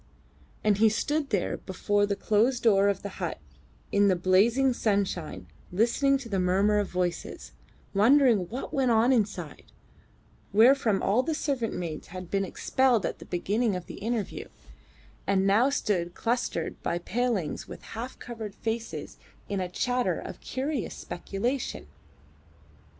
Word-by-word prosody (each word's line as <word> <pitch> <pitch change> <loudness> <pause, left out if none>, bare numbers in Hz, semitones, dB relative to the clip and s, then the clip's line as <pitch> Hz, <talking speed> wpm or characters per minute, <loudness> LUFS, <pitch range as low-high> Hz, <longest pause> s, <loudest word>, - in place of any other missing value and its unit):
And 210 -1 +3
he 220 0 +6
stood 290 +7 -1
there 200 -5 0
before 205 +2 0
the 200 - 0
closed 230 +5 +1
door 200 -3 +5
of 200 -1 0
the 200 - -7
hut - - -2 0.5
in 200 0 +4
the 190 - +4
blazing 220 +9 +3
sunshine 200 -8 -1 0.3
listening 240 +8 +3
to 265 -3 -9
the 195 -4 -1
murmur 195 +3 +3
of 205 - -1
voices, 180 -1 -3 0.4
wondering 225 -3 +4
what 250 +4 -6
went 265 -2 +2
on 235 +3 +4
inside, 200 - -2 0.8
wherefrom 225 -2 +5
all 210 +6 +3
the 310 +4 -2
servant 265 -7 -1
maids 165 -3 -5
had 185 0 -8
been 195 0 +1
expelled 245 +3 +1
at - - -3
the - - -10
beginning 205 +4 0
of 180 -1 -5
the - - -9
interview, 220 0 -3 0.8
and 195 -1 +2
now 215 +7 +4
stood 180 -10 -1
clustered 235 -8 -2
by 170 - -1
the 175 - -9
palings 225 -8 -1
with - - -10
half 235 +3 -6
covered 220 -4 -7
faces 225 +1 -4 0.3
in 200 -1 -2
a 180 -1 -2
chatter 250 +7 0
of - - -8
curious 270 -2 -3
speculation. 235 +9 -3
210 Hz, 150 wpm, -28 LUFS, 190-245 Hz, 0.8 s, he